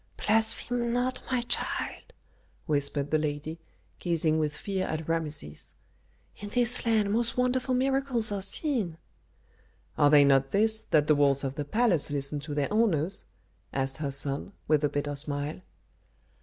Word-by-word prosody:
"Blaspheme 230 +2 +1
not, 250 +1 -1
my 255 -2 +1
child," 375 - -2 0.5
whispered 145 -1 0
the 155 - +3
lady, 150 +2 -4 0.4
gazing 160 -2 +1
with 150 -1 -2
fear 190 -2 -3
at 155 0 -4
Rameses. 155 - -4 0.6
"In 205 - -7
this 245 +2 +3
land 215 -3 +2
most 235 +2 0
wonderful 250 +1 +1
miracles 265 -3 +2
are 200 -1 -2
seen." 195 - -1 1.0
"Are 145 - +5 0.2
not 135 -1 +3
they 200 - +1
this, 220 0 +2
that 150 -2 +3
the 155 - +4
walls 140 -1 +3
of 135 -1 -2
the 145 0 -4
palace 205 - +2
listen 145 0 -1
to 145 +1 -6
their 145 +7 -1
owners?" 195 -5 +1 0.5
asked 135 0 -2
her 150 -2 -3
son, 140 +6 -2
with 155 -1 +2
a 145 - +2
bitter 145 0 -3
smile. 145 +3 -2
160 Hz, 150 wpm, -28 LUFS, 145-230 Hz, 1.0 s, Are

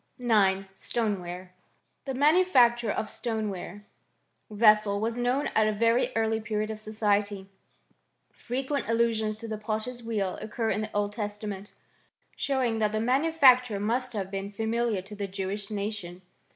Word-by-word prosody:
IX. 205 -6 +3
STONEWARE. 185 -5 -3 0.5
The 270 -2 -3
manufacture 265 - +4
of 215 - -1
stoneware 210 -4 -4 0.6
vessels 210 -1 +4
was 225 +2 -1
known 250 +4 +1
at 215 -1 +4
a - - +2
very 230 +3 +2
early 225 0 +1
period 215 0 -2
of 215 - -6
society. 205 -2 -1 0.9
Frequent 270 +3 -3
allusions 225 -2 +1
to 230 +1 -7
the 215 -1 -4
potter's 220 +3 -4
wheel 210 -5 -2
occur 220 +1 -2
in 210 - -1
the 215 0 -5
Old 205 0 -1
Testament, 210 -1 -5 0.6
showing 255 -5 0
that 215 -1 +1
the 215 - 0
manufacture 255 -3 +4
must 240 +5 -1
have 195 -3 -4
been 195 0 -4
familiar 220 -1 -1
to 210 +2 -10
the 200 -1 -3
Jewish 195 +1 -4
nation. 200 -4 -5
215 Hz, 140 wpm, -28 LUFS, 205-235 Hz, 0.9 s, manufacture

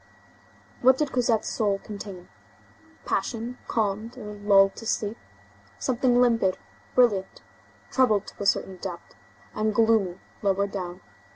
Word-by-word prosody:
What 260 +1 +6
did 295 -2 -1
Cosette's 240 -3 +1
soul 205 -3 +1
contain? 195 -3 -9 0.8
Passion 240 +1 -2
calmed 220 +2 -1
or 210 -4 -7
lulled 200 -1 +4
to 225 - -8
sleep; 210 0 -1 0.6
something 245 -1 +2
limpid, 230 -6 +3 0.4
brilliant, 210 -7 +2 0.5
troubled 220 -6 +3
to - - -12
a 200 - 0
certain 190 -1 +1
depth, 180 -2 -7 0.4
and 215 0 0
gloomy 220 -5 +3 0.2
lower 200 0 +2
down. 180 -3 -6
210 Hz, 120 wpm, -26 LUFS, 195-235 Hz, 0.8 s, What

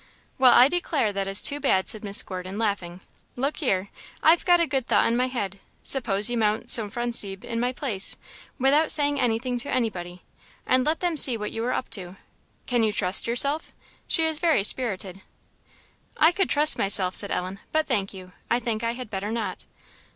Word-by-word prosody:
"Well, 255 -1 +6
I 250 - +6
declare 295 -9 -2
that 195 0 -3
is 195 +1 +3
too 285 - +2
bad," 190 -8 0
said 215 - -1
Miss 200 -1 +5
Gordon, 185 +1 -8
laughing. 190 -5 -3 0.3
"Look 275 +4 -3
here 195 - -2 0.3
I've 325 +2 +4
got 350 -1 +4
a 340 - +2
good 270 -5 -3
thought - - +2
in 230 - 0
my 250 +1 0
head: 200 -7 -5 0.2
suppose 210 -6 +1
you 240 -1 -2
mount 215 +2 -1
Sophronisbe 215 -3 +1
in 230 -1 -4
my 245 +1 -1
place, 240 -7 -2 0.4
without 285 +4 +2
saying 290 -1 +4
anything 245 +1 -2
to 245 - -7
anybody, 185 -8 -4 0.4
and 255 0 +2
let 315 +1 -1
them 350 -3 -2
see 255 -4 +2
what 210 -1 -6
you 225 - -5
are 250 - -1
up - - -4
to. 185 -2 -2 0.5
Can 245 -2 0
you 220 -1 +1
trust 190 -1 +3
yourself? 280 +6 +2 0.3
she's 320 -2 +1
very 325 - +1
spirited." 195 -5 -1 1.0
"I 320 +2 +4
could 385 +2 -1
trust 300 +1 +3
myself," 190 -2 +2
said 200 - +7
Ellen; 185 +1 -4
"but, 315 0 0
thank 205 -7 -2
you, 185 -2 -12 0.2
I 240 - +1
think 230 -2 -4
I 230 0 -1
had 245 -3 -9
better 200 +1 -4
not." 230 0 -5
230 Hz, 190 wpm, -24 LUFS, 195-270 Hz, 1.0 s, said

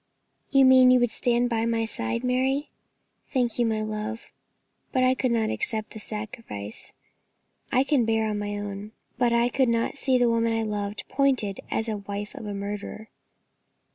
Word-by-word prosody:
"You 275 -1 +5
mean 260 -1 +7
you 255 0 +6
would 245 -2 +2
stand 240 +1 +1
by 230 -1 0
my 230 -1 +1
side, 220 - -2
Mary? 260 +3 0 0.6
Thank 245 -3 0
you, 240 - +3
my 215 -1 0
love, 215 +1 -5 0.6
but 255 - +2
I 255 0 +5
could 260 0 0
not 225 -2 +1
accept 220 - -2
the 220 - -8
sacrifice. 210 - -7 0.8
I 255 - +4
can 275 -3 +2
bear 220 -1 +1
my 205 0 -3
own 205 -1 -5
lot, 210 - -13 0.3
but 245 -1 +3
I 235 0 +3
could 255 0 +2
not 230 +3 0
see 260 -2 +3
the 245 -1 +3
woman 230 0 +2
I 225 - 0
loved 205 -1 -3
pointed 260 -8 +1
at - - -11
as 220 - -1
the 220 -2 -2
wife 205 +1 -5
of 215 - -8
a 205 - -3
murderer." 205 +2 -6
230 Hz, 185 wpm, -26 LUFS, 210-250 Hz, 0.8 s, mean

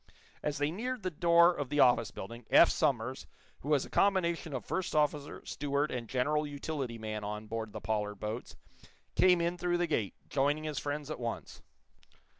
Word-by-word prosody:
As 150 0 -2
they 145 +1 0
neared 245 +6 -4
the 185 - -1
door 170 +2 +5
of 145 -6 -4
the 145 - -1
office 120 -4 +5
building, 115 +5 -8
Eph 170 - +7
Somers, 130 0 0 0.3
who 145 - -7
was 145 -3 +3
a - - -12
combination 170 -5 +2
of 130 -6 -4
first 185 -3 -2
officer, 150 -1 0
steward 145 +1 -1
and 120 -3 -4
general 150 +4 +1
utility 140 -4 -4
man 110 -1 -5
on 105 +1 -4
board 110 0 -4
the - - -7
Pollard 105 -1 -1
boats, 110 +4 -5 0.6
came 180 -1 +5
in 170 +1 -1
through 175 0 +1
the 175 - +1
gate, 105 - -1
joining 145 +2 +1
his 150 -3 -3
friends 145 +1 -4
at - - -5
once. 120 -1 -5
145 Hz, 185 wpm, -32 LUFS, 115-165 Hz, 0.6 s, Eph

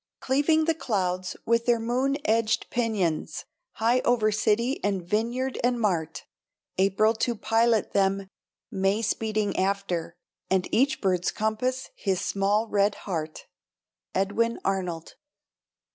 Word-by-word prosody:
Cleaving 295 +4 +2
the 330 - +2
clouds 185 - -2
with 230 +1 +1
their 240 -1 +4
moon 255 +5 0
edged 220 0 +1
pinions, 210 -10 -1 0.3
High 235 +3 +2
over 235 -4 +2
city 215 +5 +1
and 195 -4 -1
vineyard 240 +6 -1
and 245 0 +2
mart; 175 -8 -1 0.5
April 200 +3 +3
to 240 +1 0
pilot 225 +1 +1
them; 195 0 +1 0.4
May 195 +3 +1
speeding 215 -1 -1
after; 190 -3 -1 0.3
And 190 -1 +1
each 270 +5 +2
bird's 180 -3 +1
compass 250 +5 -2
his 190 -3 -1
small 200 +3 +1
red 205 -1 +2
heart. 160 -5 -4 0.7
_Edwin 230 +5 +1
Arnold. 180 -4 -3
215 Hz, 120 wpm, -26 LUFS, 195-235 Hz, 0.7 s, their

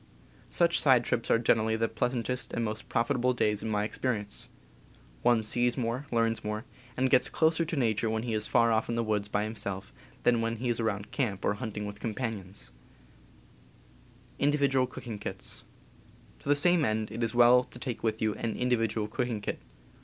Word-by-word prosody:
Such 170 -2 +2
side 130 -4 +5
trips 120 0 -1
are - - +5
generally 110 -1 +2
the 115 +1 +1
pleasantest 125 +2 -2
and 115 - 0
most 110 0 -5
profitable 125 +1 +1
days 105 -3 +1
in 110 - -3
my 105 -1 +1
experience. 105 -2 -3 0.7
One 120 -2 +3
sees 120 +3 +1
more, 125 +3 -2
learns 115 -1 +1
more, 105 +3 -3 0.3
and 130 +1 +3
gets - - +4
closer 160 +1 +2
to 165 - -3
nature 115 -4 +1
when 110 0 -1
he 120 -2 -2
is 105 -1 +1
far 115 0 +3
off 110 +1 +1
in 115 - -1
the 115 - 0
woods 105 -2 -1
by 105 0 0
himself 100 -3 -3 0.3
than 120 -1 +3
when 115 0 -1
he 120 +2 -3
is 120 - 0
around 105 -2 -2
camp 110 -9 -2
or - - +2
hunting 105 -1 -5
with 105 0 -7
companions. 105 -4 -5 1.7
To 145 - +3
the 130 0 -3
same 175 +3 +4
end 110 -3 -1
it 115 +2 -5
is 115 0 -1
well 120 +1 +7
to - - -11
take 125 -2 -4
with 110 -1 -1
you 110 -1 +1
an 115 +1 -3
indi 125 0 +1
vidual 110 -1 -1
cooking 120 0 -2
kit. 100 - -4
115 Hz, 180 wpm, -29 LUFS, 110-125 Hz, 1.7 s, well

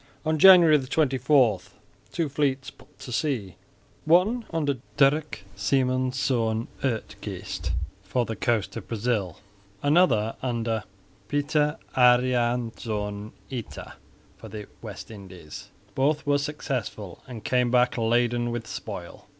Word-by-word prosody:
On 155 0 +1
January 170 -4 +8
24 130 - +2 0.5
two 165 -2 -1
fleets 140 -2 -1
put - - -22
to 125 - -9
sea, 115 - -2 0.5
one 195 +9 +3
under 145 -5 -1 0.2
Dirk 145 -4 +2
Simonsz 125 0 0 0.2
Uitgeest 110 -8 -4 0.3
for 110 +5 -1
the 115 - -4
coast 115 -3 0
of - - -7
Brazil; 105 -6 -1 0.5
another 145 -8 +3
under 115 -3 -2 0.4
Pieter 150 +3 +1 0.2
Adriansz 120 -4 +1 0.2
Ita 125 -4 -7 0.4
for - - -11
the 105 -1 -7 0.2
West - - -8
Indies. 95 -7 -10 0.2
Both 145 +5 +1
were 145 0 +2
successful 130 - -4
and 120 -4 -8
came 125 -1 +2
back 125 0 +3
laden 120 +1 +1
with 120 -1 -4
spoil. 100 -3 -8
125 Hz, 110 wpm, -26 LUFS, 110-145 Hz, 0.5 s, January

